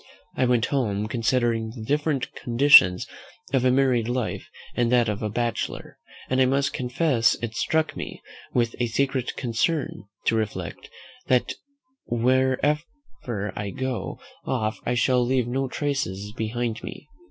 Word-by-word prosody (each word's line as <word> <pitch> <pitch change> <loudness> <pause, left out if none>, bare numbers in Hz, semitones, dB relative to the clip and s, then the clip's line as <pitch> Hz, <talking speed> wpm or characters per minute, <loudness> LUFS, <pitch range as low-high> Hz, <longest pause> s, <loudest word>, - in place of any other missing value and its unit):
I 130 - +2
went 120 -3 +3
home, 105 -6 0
considering 115 -1 0
the 115 - -7
different 145 +1 -1
conditions 120 -8 +6 0.5
of 130 -2 +3
a 130 - +4
married 125 -3 +3
life 125 -2 -2 0.3
and 120 -1 +1
that 120 -2 +4
of 105 -1 -2
a 105 - -1
bachelor; 120 +1 -3 0.3
and 130 0 +2
I - - +6
must 140 +2 +1
confess 125 -2 +2
it 115 -2 -3
struck 160 +6 0
me - - -6 0.3
with 120 -2 +1
a 120 - +1
secret 130 +1 -1
concern, 130 +2 -1 0.2
to - - +3
reflect, 110 -2 -3 0.4
that 125 -2 +2 0.5
whenever 130 - -1
I 100 -1 -3
go 130 +1 -4 0.2
off 110 -5 -1
I 120 - +1
shall 125 +1 +3
leave 125 -1 +1
no 135 +2 -1
traces 125 -9 -3
behind 115 0 -2
me. - - -8
125 Hz, 140 wpm, -25 LUFS, 115-135 Hz, 0.5 s, conditions